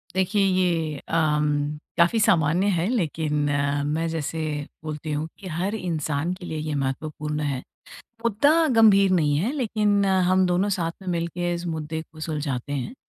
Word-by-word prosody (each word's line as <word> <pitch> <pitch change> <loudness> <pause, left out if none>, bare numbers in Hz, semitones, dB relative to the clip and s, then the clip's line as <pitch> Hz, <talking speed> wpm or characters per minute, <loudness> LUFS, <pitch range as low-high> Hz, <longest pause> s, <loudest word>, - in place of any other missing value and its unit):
देखिए 190 +2 +1
ये 170 -5 +1
अ, - - -13 0.9
काफ़ी 175 +7 +4
सामान्य 170 0 +3
है 170 +3 0
लेकिन 160 - -1 0.5
मैं 160 +3 -1
जैसे 160 0 -3 0.4
बोलती 155 0 -5
हूँ 150 +2 -2
कि 195 - -8
हर 180 +6 -2
इंसान 160 -3 -2
के 185 -1 -9
लिए 160 - -4
ये 155 -1 -3
महत्वपूर्ण 150 +2 -3
है। 140 -3 -1 0.7
मुद्दा 235 +6 +3 0.2
गंभीर 200 -4 +6
नहीं 150 -5 +2
है 225 - 0
लेकिन 210 -6 +1 0.2
हम 185 0 +4
दोनों 180 +3 +1
साथ 165 -1 -2
में 185 - -6
मिलके 175 0 -1
इस 170 +1 -5
मुद्दे 160 -1 -3
को 155 - -13
सुलझाते 145 -3 -3
हैं। 145 - -3
165 Hz, 155 wpm, -24 LUFS, 150-190 Hz, 0.9 s, गंभीर